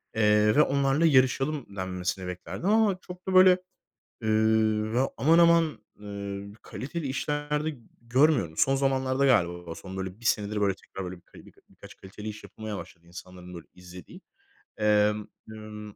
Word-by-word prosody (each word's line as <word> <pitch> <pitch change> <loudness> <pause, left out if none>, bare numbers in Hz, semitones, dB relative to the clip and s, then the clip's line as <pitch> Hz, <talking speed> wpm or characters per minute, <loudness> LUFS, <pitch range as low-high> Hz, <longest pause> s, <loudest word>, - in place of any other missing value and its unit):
Eee, 105 -1 +3
ve 150 - +6
onlarla 140 +2 +2
yarışalım." 135 -4 +2
denmesini 90 0 -4
beklerdim 90 - -4
ama 215 -3 +3
çok 180 +1 -12
da, 190 - -1
böyle, 185 0 +7 0.6
eee, 110 - -2 0.7
ya, 130 +2 +2
aman 165 +4 +4
aman, 170 -3 +4 0.2
eee, 100 0 -7
kaliteli 145 +4 -6
işler 145 +2 -2
de 155 -4 -3 0.2
görmüyorum. 120 - +2
Son 135 - +3
zamanlarda 135 0 +1
galiba, 90 -9 +1
son, 95 0 -9
böyle, 95 +1 -6
1 120 - -15
senedir, 105 -1 0
böyle, 100 -2 +1
tekrar, 95 0 -9
böyle, 90 - -9 0.3
birka - - -19
birkaç - - -15
kaliteli 105 +3 -9
iş 105 0 -9
yapılmaya 110 -2 -7
başladı 85 -1 -11
insanların, 90 0 -11
böyle, 85 -2 -10
izlediği. 90 -1 -13 0.6
Emm, 105 0 +2 0.2
ımm, 105 -1 -10
110 Hz, 150 wpm, -27 LUFS, 95-140 Hz, 0.7 s, böyle